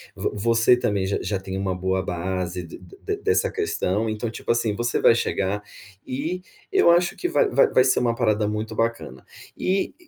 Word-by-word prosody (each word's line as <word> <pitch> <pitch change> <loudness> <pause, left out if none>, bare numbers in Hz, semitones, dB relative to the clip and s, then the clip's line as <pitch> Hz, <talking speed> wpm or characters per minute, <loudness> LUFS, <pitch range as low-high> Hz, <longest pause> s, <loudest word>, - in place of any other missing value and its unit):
Vo - - -2 0.2
você, 115 +2 +5
também, 100 -5 0
j 100 - 0
já 100 -2 -2
tem 95 0 -5
uma 95 -1 -1
boa 95 +1 -1
base 90 0 -3
d 85 - -11
d 410 +1 -6
dessa 430 +2 +1
questão. 115 - -1
Então, 110 +2 -3
tipo, 115 - -3
assim, 115 -3 0
você 120 +2 -1
vai 115 - +6
chegar 100 -2 -1 0.4
e 155 +8 -3 0.3
eu 170 - +5
acho 175 +1 +2
que 355 - -1
va 450 +5 +2
va - - +4
vai 130 - +4
ser 130 - +3
uma 120 -1 +1
parada, 110 -3 +1
muito, 105 +1 -3
bacana. 115 - -2 0.3
E, 190 +1 0
110 Hz, 190 wpm, -23 LUFS, 95-130 Hz, 0.4 s, vai